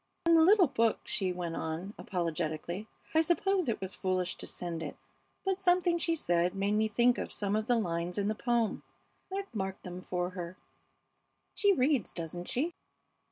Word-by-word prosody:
"And 335 0 +6
the 325 - +7
little 375 +3 +7
book," 230 -6 +1
she 190 -4 0
went 175 -2 -3
on, 165 +6 -4
apologetically; 170 +2 -3 0.3
"I 320 - +6
suppose 355 0 +2
it 225 - -1
was 190 0 -4
foolish 185 -1 0
to - - -5
send 170 -2 -4
it, 150 - -5 0.5
but 385 0 0
something 355 -1 +3
she 330 0 +1
said 175 - +1
made 195 +1 0
me 215 +1 +3
think 240 +3 +3
of - - -4
some 200 0 -1
of 215 +1 -1
the 245 - +4
lines 175 -3 -1
in 200 0 +1
the 215 - +1
poem. 235 0 0 0.5
I've 390 +1 -4
marked 190 -3 -3
them 180 0 -6
for 180 0 -2
her. 180 0 -6 1.0
She 405 -1 +4
reads, 265 - +2
doesn't 175 +1 -5
she?" 315 +8 0
205 Hz, 180 wpm, -31 LUFS, -, 1.0 s, the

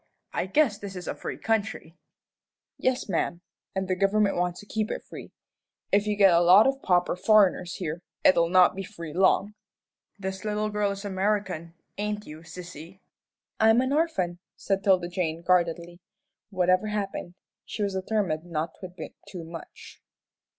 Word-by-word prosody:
I - - -1
guess 225 -2 +2
this 200 -2 -7
is 180 - -7
a - - -1
free - - -6
country." 220 -6 -2 0.8
"Yes, 255 -1 0
ma'am, 175 -2 -1 0.3
and 190 0 -1
the 185 - 0
government 200 +2 +2
wants 175 0 -1
to - - -14
keep 215 +1 -2
it - - -4
free. - - -10 0.6
If 205 +1 +3
you 210 - +1
get 195 -3 +6
a 170 - +5
lot 185 +5 +7
of 270 0 +1
pauper 180 -1 +2
foreigners 190 -2 +3
here, 165 -2 -4 0.2
it'll 170 -2 +5
not 185 0 +5
be 195 - -4
free 170 -6 -8
long." 195 +3 +3 0.6
"This 190 -1 -5
little 210 0 -1
girl 210 -1 +1
is 200 +1 -5
American, 190 -4 -1 0.2
ain't 210 0 -2
you, 155 +1 -10
sissy?" 170 +1 -10 0.6
"I'm 225 +2 +5
an 260 +2 +1
orphan," 195 - 0 0.2
said 195 0 -1
'Tilda 185 -3 +3
Jane, 170 -2 -3
guardedly. 175 -1 +1 0.5
Whatever 185 +1 +2
happened, 200 -4 -4 0.3
she 210 - -4
was 200 -1 -1
determined 190 -4 -1
not 160 -1 -2
to 185 - -6
admit 180 0 -9
too 180 -3 -7
much. 165 0 -11
190 Hz, 165 wpm, -27 LUFS, 175-210 Hz, 0.8 s, lot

